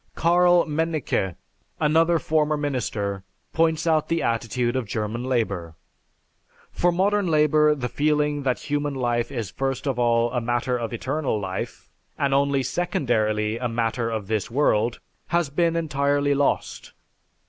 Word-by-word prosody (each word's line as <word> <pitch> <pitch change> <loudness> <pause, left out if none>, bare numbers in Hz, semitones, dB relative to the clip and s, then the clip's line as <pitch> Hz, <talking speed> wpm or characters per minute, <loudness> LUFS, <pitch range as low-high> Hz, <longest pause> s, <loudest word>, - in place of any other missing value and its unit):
Karl 175 +1 +4
Mennicke, 155 - -1 0.4
another 165 +2 +3
former 155 -1 +1
minister, 110 -9 -2 0.3
points 165 0 +1
out 160 -2 +2
the 165 0 0
attitude 120 +1 -1
of 130 -4 -2
German 110 +3 -3
Labor. 100 -10 -2 1.0
"For 175 - +2
modern 200 +2 +1
labor 150 -1 +4
the 125 -4 -3
feeling 150 +1 0
that 130 -2 -1
human 145 -1 0
life 120 -1 -1
is 115 -8 -4
first 135 0 -3
of 135 -3 -1
all 120 0 +2
a 125 -1 -1
matter 120 +2 0
of 120 -2 -3
eternal 130 0 -2
life, 95 -2 -5 0.3
and 140 -1 +1
only 140 -1 +2
secondarily 115 - 0
a 125 - -1
matter 115 0 -1
of 110 -3 -3
this 110 -1 -2
world, 120 -3 +1 0.3
has 170 -4 0
been 170 +2 +1
entirely 145 -3 +1
lost. 140 0 -1
135 Hz, 140 wpm, -24 LUFS, 115-155 Hz, 1.0 s, Karl